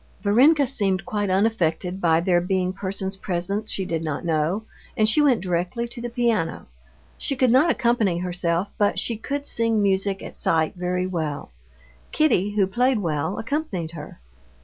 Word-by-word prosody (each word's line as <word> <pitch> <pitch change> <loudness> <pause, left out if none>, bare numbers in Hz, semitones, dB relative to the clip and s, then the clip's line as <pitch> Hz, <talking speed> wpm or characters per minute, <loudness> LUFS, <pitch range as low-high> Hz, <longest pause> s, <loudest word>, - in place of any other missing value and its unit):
Varenka 275 +9 +5
seemed 200 -7 0
quite 205 -2 -2
unaffected 185 -2 0
by 165 -1 +3
there 175 0 +2
being 185 0 -1
persons 190 0 -4
present 195 +3 -3
she 190 - -2
did 165 -2 -2
not 155 +1 -3
know, 165 +6 0 0.3
and 215 - +3
she 225 +8 +4
went 265 -8 +3
directly 180 +6 -2
to 235 0 -9
the 240 - -4
piano. 235 -8 -1 0.5
She 275 - -1
could 255 -2 +3
not 270 +7 +5
accompany 235 - +1
herself, 175 +1 -2
but 205 -1 +2
she 235 - -1
could 280 +6 -4
sing 230 -3 +1
music 195 -1 0
at - - -8
sight 160 -1 +1
very 180 0 -2
well. 155 - -4 0.6
Kitty, 205 - +2
who 200 -2 +4
played 245 +6 +1
well, 160 -1 -2
accompanied 225 - -3
her. 150 - -10
195 Hz, 165 wpm, -23 LUFS, 175-230 Hz, 0.6 s, Varenka